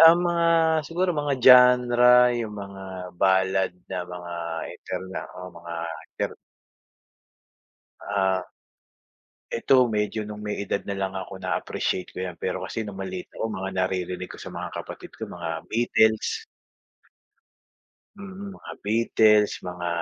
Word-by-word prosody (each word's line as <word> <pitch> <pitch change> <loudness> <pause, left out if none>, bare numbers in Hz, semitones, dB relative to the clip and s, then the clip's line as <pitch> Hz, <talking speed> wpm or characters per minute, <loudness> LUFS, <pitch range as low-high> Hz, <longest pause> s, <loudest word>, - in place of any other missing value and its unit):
ang 165 +1 +9
mga 175 -1 +1 0.5
siguro 180 +4 0
mga 145 -1 0
genre 125 -1 +7 0.2
'yung 115 -3 -3
mga 100 -1 -8 0.3
ballad 95 0 +3 0.2
na - - -3
mga 90 -1 -8 0.4
interna 95 0 -5 0.2
o 90 0 -7
mga 85 0 -8 0.4
inter - - -2 1.7
Ah. 95 -2 0 1.1
Eto 130 +2 +4
medyo 105 -1 -1
no'ng 105 0 -7
may 105 0 -3
edad 100 - -1
na 100 -1 -4
lang 95 -1 -2
ako 95 0 -6
na-appreciate 95 0 -2
ko - - -10
'yan, 90 -2 -3
pero 95 +1 -3
kasi 115 - -3
no'ng 100 -2 -7
maliit 95 -1 -5
ako - - -5
mga 95 -3 -4
naririnig 90 -1 -1
ko - - -11
sa - - -7
mga - - -6
kapatid - - -10
ko - - -7
mga 80 -2 -4
Beetles. 110 - +2 1.7
Mm, 200 0 -8
mga - - -10
Beatles, 105 -1 +3
mga 90 -1 -4
100 Hz, 130 wpm, -25 LUFS, 95-120 Hz, 1.7 s, ang